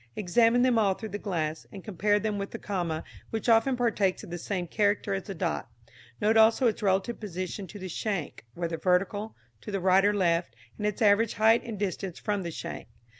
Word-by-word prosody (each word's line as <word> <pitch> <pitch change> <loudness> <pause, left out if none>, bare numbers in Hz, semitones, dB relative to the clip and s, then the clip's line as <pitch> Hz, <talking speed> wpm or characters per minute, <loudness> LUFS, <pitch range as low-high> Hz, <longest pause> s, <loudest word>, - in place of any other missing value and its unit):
Examine 230 +5 +3
them 250 -3 +4
all 200 -3 +3
through 220 - -7
the 205 - -3
glass, 160 -6 -3
and 195 -3 -9
compare 205 +1 +1
them 210 -1 -2
with 200 - -4
the - - -6
comma, 175 -6 -3 0.3
which 225 +1 -4
often 235 +3 +4
partakes 210 -6 +1
of - - -10
the 175 - -3
same 185 0 -3
character 205 +2 +1
as 195 -1 -3
the 195 - -6
dot. 170 -1 -2 0.5
Note 220 +2 +3
also 225 +4 +5
its 225 -3 +1
relative 195 +4 +1
position 185 -1 -5
to 205 - -10
the 190 -1 -6
shank, 185 - -3
whether 170 -1 -3
vertical, 200 +4 0 0.3
to - - -9
the 200 -1 -1
right 190 +1 +4
or 205 - +4
left, 170 - +1 0.2
and 210 - 0
its 210 +2 -1
average 210 +2 +4
height 220 +2 +4
and 225 -3 -6
distance 190 -2 -3
from 205 -2 -2
the 170 - -4
shank. 160 - -6
200 Hz, 210 wpm, -28 LUFS, 185-220 Hz, 0.5 s, also